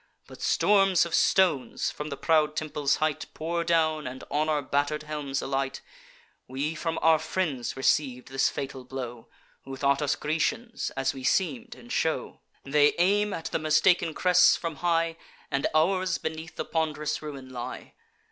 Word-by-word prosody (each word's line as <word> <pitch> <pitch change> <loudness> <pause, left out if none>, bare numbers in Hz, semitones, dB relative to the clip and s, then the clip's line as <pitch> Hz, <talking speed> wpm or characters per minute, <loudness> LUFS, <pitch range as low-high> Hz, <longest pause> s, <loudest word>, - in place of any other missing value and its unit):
But - - -13
storms 195 -4 +4
of 170 - -7
stones, 175 -9 +2
from 150 +1 -6
the 140 - -5
proud 155 -2 +2
temple's 150 -2 0
height, 155 -1 -1
Pour 170 +2 -2
down, 155 -3 +1
and 130 +1 -7
on 155 +2 +1
our 150 -2 +1
batter'd 145 +3 -1
helms 150 -3 -3
alight: 135 0 -2 0.7
We 140 +5 -2
from 165 0 -3
our 160 -1 +5
friends 155 -8 -2
receiv'd 130 -2 +1
this 135 0 +2
fatal 135 -1 -6
blow, 125 -2 -7 0.4
Who 135 0 -7
thought 140 +1 +1
us 145 -1 +1
Grecians, 160 - -2
as 135 0 0
we 135 - -9
seem'd 230 - 0
in 240 - -15
show. 160 -8 -1 0.2
They 145 +1 +3
aim 205 +4 +2
at 165 - -5
the - - 0
mistaken 160 +2 +3
crests, 180 -1 +5
from 165 -3 -5
high; 165 -1 +1 0.3
And 140 - +1
ours 185 +2 +2
beneath 160 +1 -6
the - - -4
pond'rous 155 -2 -2
ruin 140 -4 -8
lie. 120 -2 -7
155 Hz, 160 wpm, -27 LUFS, 140-165 Hz, 0.7 s, our